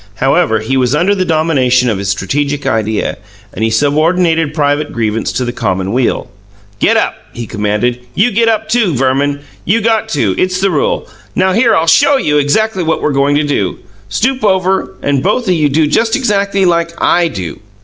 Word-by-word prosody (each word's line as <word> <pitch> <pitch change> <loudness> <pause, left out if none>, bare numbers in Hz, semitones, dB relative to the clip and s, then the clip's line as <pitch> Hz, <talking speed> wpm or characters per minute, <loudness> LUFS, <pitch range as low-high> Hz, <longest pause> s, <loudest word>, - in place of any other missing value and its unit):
However, 135 - +1
he 130 +5 -1
was 130 +1 +1
under 180 +6 +2
the 185 -2 -1
domination 140 -7 +2
of 105 -5 -1
his 100 -1 -3
strategic 140 +9 -2
idea, 110 -2 -1 0.3
and - - -4
he 115 - +2
subordinated 160 +5 +1
private 145 -1 0
grievance 115 -1 -2
to 125 +2 -1
the 120 - -3
common 95 -3 -2
weal. 125 -1 0 0.5
"Get - - +3
up!" - - +1 0.2
he 120 - -6
commanded. 105 +3 -1 0.2
"You 220 +5 +2
get 230 +2 +2
up, 220 -1 0
too, 220 - +1
Verman. 135 +3 0 0.2
You 210 +6 +1
got 225 0 0
to 110 - 0
it's 185 0 0
the 195 0 +1
rule. 150 - -1 0.3
Now 190 0 +2
here 230 +2 +3
I'll 160 - +2
SHOW 280 - +4
you 150 - +1 0.4
what 160 0 -1
we're 150 - +1
goin' 140 +1 +2
to 150 - +2
do. 120 -11 -1 0.3
Stoop 260 - -1
over, 190 - +1
and 140 -2 +1
both 210 - 0
o' - - +2
you 155 -4 +2
do 155 +3 +2
just 225 +10 +1
exackly 200 -6 0
like 170 -1 0
I 175 -1 +2
do. 95 - -6
150 Hz, 190 wpm, -13 LUFS, 125-190 Hz, 0.5 s, SHOW